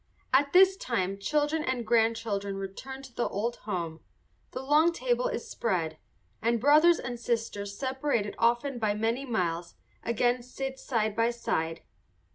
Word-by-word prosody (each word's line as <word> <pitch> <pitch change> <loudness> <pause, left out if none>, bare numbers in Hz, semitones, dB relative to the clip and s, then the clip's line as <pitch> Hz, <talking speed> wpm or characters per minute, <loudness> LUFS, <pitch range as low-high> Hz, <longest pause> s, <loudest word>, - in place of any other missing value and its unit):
At 280 +2 +4
this 380 +1 +6
time 195 - -2
children 300 +7 0
and 255 -4 -1
grandchildren 225 -3 +1
return 260 +8 -7
to 260 -2 -12
the 240 - 0
old 230 +4 -2
home, 170 -4 -3 0.5
the 255 - -6
long 305 +5 +4
table - - 0
is - - -4
spread, 165 -8 -2 0.4
and 230 +1 +2
brothers 305 +7 +6
and 245 -1 -5
sisters, 220 -4 -2
separated 260 -5 -1
often 240 +3 +2
by 210 -2 +1
many 230 +5 -1
miles, 175 -6 -2 0.3
again 240 +2 +1
sit 265 +2 -5
side 220 -4 -1
by 230 +1 +3
side. 165 -8 -2
235 Hz, 145 wpm, -29 LUFS, 205-270 Hz, 0.5 s, this